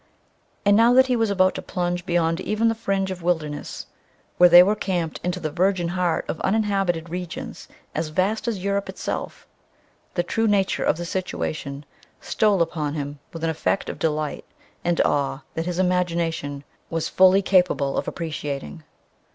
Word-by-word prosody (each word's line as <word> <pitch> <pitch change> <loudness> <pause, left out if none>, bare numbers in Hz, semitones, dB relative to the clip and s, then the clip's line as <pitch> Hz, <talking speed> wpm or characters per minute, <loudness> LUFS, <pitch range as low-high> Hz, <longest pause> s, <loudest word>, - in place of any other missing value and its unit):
And 205 0 +5
now 230 +3 +5
that 260 +1 +7
he 255 -1 +1
was 225 -2 +1
about 185 -2 +3
to - - -5
plunge 175 0 -3
beyond 170 -1 +1
even 215 +4 +1
the - - +1
fringe 195 -4 -1
of 180 -1 -6
wilderness 160 -4 -2 0.5
where 180 0 +8
they 175 +1 +10
were 205 +3 +2
camped 175 -6 -2
into 180 +1 -2
the 155 -3 -3
virgin 180 +1 +1
heart 175 -2 0
of 160 - -4
uninhabited 195 -5 0
regions 180 -1 -6 0.3
as 165 - -2
vast 190 +9 -1
as 205 -6 -2
Europe 200 0 -1
itself, - - -5 0.7
the 175 - +1
true 225 +5 0
nature 200 -2 +1
of - - +2
the 175 - -4
situation 150 -5 -4 0.3
stole 205 -5 +2
upon 155 -3 -3
him 145 -1 -5
with 165 -1 -8
an 165 - +1
effect 160 +4 -1
of - - -6
delight 155 -1 -1 0.4
and 175 -1 0
awe 140 -1 0
that 165 +1 -3
his 175 -1 -2
imagination 170 -6 0 0.3
was 165 -1 -1
fully 190 +1 +5
capable 180 -8 +2
of - - -2
appreciating. 155 -2 -5
175 Hz, 165 wpm, -23 LUFS, 160-195 Hz, 0.7 s, they